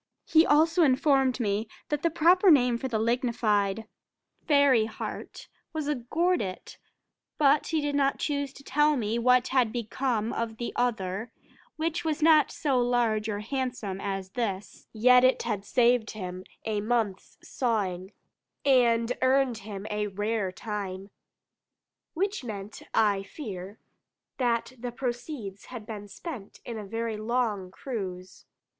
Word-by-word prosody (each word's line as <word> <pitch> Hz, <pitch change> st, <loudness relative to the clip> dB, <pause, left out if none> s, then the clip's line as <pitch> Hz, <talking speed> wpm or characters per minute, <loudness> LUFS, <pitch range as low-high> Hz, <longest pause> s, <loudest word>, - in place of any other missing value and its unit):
He 320 Hz, +1 st, +5 dB
also 325 Hz, +4 st, +4 dB
informed 270 Hz, -2 st, +3 dB
me, 210 Hz, -1 st, 0 dB, 0.2 s
that 295 Hz, -1 st, -1 dB
the 335 Hz, -, +2 dB
proper 355 Hz, +4 st, +5 dB
name 250 Hz, -6 st, +5 dB
for 265 Hz, -, -3 dB
the 235 Hz, -4 st, -1 dB
lignified 220 Hz, -3 st, 0 dB, 0.6 s
fairy 280 Hz, -6 st, +5 dB
heart, 220 Hz, -, -7 dB, 0.3 s
was 310 Hz, -2 st, -3 dB
a 295 Hz, -, +2 dB
"gordit:" 265 Hz, -, -2 dB, 0.6 s
but 290 Hz, 0 st, +4 dB
he 320 Hz, -2 st, 0 dB
did 290 Hz, 0 st, -1 dB
not 275 Hz, -1 st, +2 dB
choose 285 Hz, -2 st, -2 dB
to 275 Hz, -, -14 dB
tell 295 Hz, +2 st, +2 dB
me 225 Hz, 0 st, -1 dB
what 250 Hz, +1 st, +4 dB
had 255 Hz, -4 st, +2 dB
become 235 Hz, -1 st, -1 dB
of 225 Hz, -1 st, -3 dB
the 240 Hz, -, -4 dB
other, 220 Hz, -2 st, -1 dB, 0.4 s
which 330 Hz, +2 st, -2 dB
was 315 Hz, -1 st, -1 dB
not 315 Hz, -1 st, +6 dB
so 275 Hz, -5 st, 0 dB
large 235 Hz, -3 st, +1 dB
or 205 Hz, -1 st, -2 dB
handsome 240 Hz, -5 st, -3 dB
as 195 Hz, -1 st, -4 dB
this, 205 Hz, -5 st, -4 dB
yet 250 Hz, +3 st, +5 dB
it 255 Hz, 0 st, +3 dB
had 210 Hz, -4 st, -2 dB
saved 240 Hz, 0 st, +2 dB
him 185 Hz, -3 st, -6 dB, 0.2 s
a 215 Hz, -2 st, -1 dB
month's 220 Hz, -3 st, -1 dB
sawing, 195 Hz, -6 st, -2 dB, 0.5 s
and 240 Hz, -3 st, +3 dB
earned 260 Hz, -2 st, +2 dB
him 200 Hz, -1 st, -7 dB
"a 210 Hz, 0 st, -1 dB
rare 205 Hz, 0 st, -2 dB
time," 195 Hz, -1 st, -5 dB, 1.0 s
which 395 Hz, 0 st, -1 dB
meant, 210 Hz, -2 st, -7 dB
I 205 Hz, -3 st, +3 dB
fear, 195 Hz, -, -8 dB, 0.6 s
that 240 Hz, 0 st, 0 dB
the 245 Hz, +1 st, -4 dB
proceeds 240 Hz, -4 st, -5 dB
had 240 Hz, -4 st, -8 dB
been 210 Hz, -2 st, -7 dB
spent 215 Hz, -, -8 dB
in 230 Hz, -2 st, -5 dB
a 210 Hz, -, -7 dB
very 225 Hz, +1 st, -3 dB
long 215 Hz, -4 st, -1 dB
cruise. 190 Hz, -5 st, -7 dB
235 Hz, 140 wpm, -28 LUFS, 210-270 Hz, 1.0 s, not